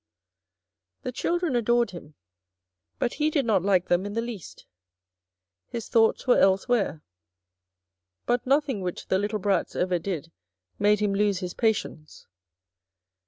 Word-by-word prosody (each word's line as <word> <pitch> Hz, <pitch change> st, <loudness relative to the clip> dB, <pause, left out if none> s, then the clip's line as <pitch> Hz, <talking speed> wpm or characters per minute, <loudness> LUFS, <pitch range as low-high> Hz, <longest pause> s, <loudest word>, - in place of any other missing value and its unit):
The 255 Hz, -, -3 dB
children 340 Hz, +2 st, -1 dB
adored 240 Hz, 0 st, +2 dB
him, 155 Hz, -4 st, -11 dB, 0.8 s
but 240 Hz, -, -1 dB
he 300 Hz, 0 st, +1 dB
did 290 Hz, -4 st, 0 dB
not 210 Hz, -5 st, +3 dB
like 185 Hz, -1 st, +2 dB
them 175 Hz, +1 st, +2 dB
in 205 Hz, 0 st, -5 dB
the 230 Hz, -, 0 dB
least. 230 Hz, -7 st, -8 dB, 1.0 s
His 230 Hz, -2 st, -6 dB
thoughts 225 Hz, -1 st, +3 dB
were 250 Hz, -, +4 dB
elsewhere. 195 Hz, -3 st, +2 dB, 1.2 s
But 245 Hz, +1 st, 0 dB
nothing 275 Hz, -5 st, +1 dB
which 180 Hz, -1 st, -5 dB
the 190 Hz, -, +2 dB
little 210 Hz, +2 st, -1 dB
brats 195 Hz, -3 st, 0 dB
ever 180 Hz, -1 st, 0 dB
did 165 Hz, -2 st, -5 dB, 0.5 s
made 210 Hz, 0 st, +3 dB
him 205 Hz, -1 st, +1 dB
lose 205 Hz, -1 st, +2 dB
his 180 Hz, -1 st, -5 dB
patience. 210 Hz, -9 st, -2 dB
205 Hz, 135 wpm, -26 LUFS, 185-240 Hz, 1.2 s, were